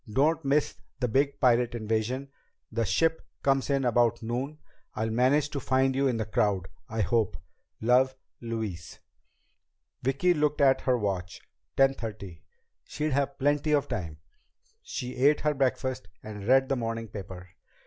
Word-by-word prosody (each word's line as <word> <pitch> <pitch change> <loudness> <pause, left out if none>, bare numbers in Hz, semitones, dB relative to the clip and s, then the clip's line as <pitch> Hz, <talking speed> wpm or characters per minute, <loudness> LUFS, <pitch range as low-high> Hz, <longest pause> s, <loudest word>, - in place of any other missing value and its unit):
Don't 155 +7 +2
miss 140 +2 +1 0.2
the 125 - +1
big 140 +4 +1
pirate 120 -2 +3
invasion. 115 +4 -2 0.4
The 115 0 0
ship 160 - +1 0.2
comes 135 0 +2
in 135 -2 +1
about 120 -1 +2
noon. 130 +6 -3 0.4
I'll 110 +1 -1
manage 135 +6 +2
to 140 - -3
find 130 0 +1
you 135 +1 +2
in 125 -3 0
the 110 - -2
crowd 100 -3 0 0.2
I 110 0 -1
hope. 100 -2 +1 0.4
Love, 130 +3 +3 0.3
Louise." 110 -7 -5 1.0
Vicki 140 +8 +2
looked 150 -2 0
at 135 -2 +4
her 125 -1 +2
watch. 95 -5 -3 0.4
Ten 135 0 +5
thirty. 100 -9 -7 0.4
She'd 155 +1 -3
have 140 0 0
plenty 145 +2 +1
of 145 -1 +2
time. 80 -4 -4 0.6
She 125 0 -5
ate 145 +4 +4
her 150 0 +1
breakfast 130 -1 -1 0.2
and 105 -1 -7
read 135 +1 +5
the 135 - +1
morning 115 -2 -3
paper. 95 -3 -9
125 Hz, 150 wpm, -28 LUFS, 110-140 Hz, 1.0 s, Ten